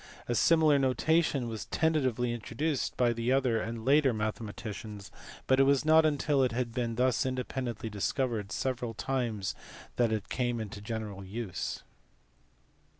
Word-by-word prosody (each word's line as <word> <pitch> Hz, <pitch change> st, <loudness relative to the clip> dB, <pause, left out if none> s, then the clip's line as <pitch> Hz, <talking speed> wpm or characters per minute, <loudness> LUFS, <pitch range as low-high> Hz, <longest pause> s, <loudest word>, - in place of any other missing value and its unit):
A 120 Hz, -, 0 dB
similar 155 Hz, +4 st, +4 dB
notation 135 Hz, 0 st, +2 dB
was 110 Hz, -2 st, -5 dB
ten 160 Hz, 0 st, +1 dB
tatively 125 Hz, -5 st, 0 dB
introduced 125 Hz, +5 st, -2 dB
by 120 Hz, -1 st, +3 dB
other 120 Hz, 0 st, +1 dB
and 115 Hz, 0 st, -5 dB
later 140 Hz, -1 st, +4 dB
mathematicians, 105 Hz, -2 st, -5 dB, 0.3 s
but 130 Hz, 0 st, +3 dB
it -, -, +7 dB
was 140 Hz, +1 st, +3 dB
not 160 Hz, 0 st, +6 dB
until 145 Hz, -1 st, +1 dB
it 130 Hz, -3 st, +2 dB
had 120 Hz, -1 st, -2 dB
been 120 Hz, -2 st, -2 dB
thus 125 Hz, +1 st, +2 dB
independently 130 Hz, -3 st, -3 dB
discovered 110 Hz, 0 st, -2 dB
several 125 Hz, -3 st, -2 dB
times 115 Hz, -4 st, -2 dB, 0.4 s
that 120 Hz, -2 st, +3 dB
it 110 Hz, -2 st, -2 dB
came 120 Hz, -2 st, -1 dB
into 105 Hz, -2 st, -6 dB
general 105 Hz, -3 st, -5 dB
use. 100 Hz, -1 st, -4 dB
120 Hz, 145 wpm, -30 LUFS, 110-135 Hz, 0.4 s, it